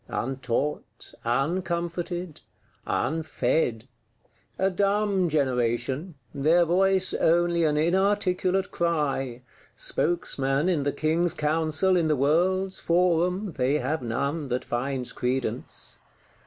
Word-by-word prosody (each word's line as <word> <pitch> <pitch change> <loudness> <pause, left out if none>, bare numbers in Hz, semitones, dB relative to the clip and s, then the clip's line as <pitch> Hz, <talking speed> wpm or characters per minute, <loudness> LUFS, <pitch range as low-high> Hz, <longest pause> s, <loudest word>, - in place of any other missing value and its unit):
Untaught, 130 +3 -3
uncomforted, 170 +5 -2 0.5
unfed! 155 -6 0 0.7
A 190 +1 +1
dumb 200 -1 +1
generation; 130 +2 -1 0.2
their 160 +5 +3
voice 190 +2 +2
only 170 0 +2
an 150 -1 +1
inarticulate 185 +2 +1
cry: 140 -7 -1 0.3
spokesman, 140 -3 0
in 175 -5 +1
the 145 0 0
King's 165 +3 0
Council, 160 +4 +2
in 170 -3 +2
the 155 - +2
world's 180 +7 +1
forum, 180 +2 +1
they 135 +3 +2
have 150 +3 -2
none 140 +6 -2
that 125 0 -2
finds 130 +1 -2
credence. 125 +1 -3
160 Hz, 100 wpm, -26 LUFS, 135-180 Hz, 0.7 s, their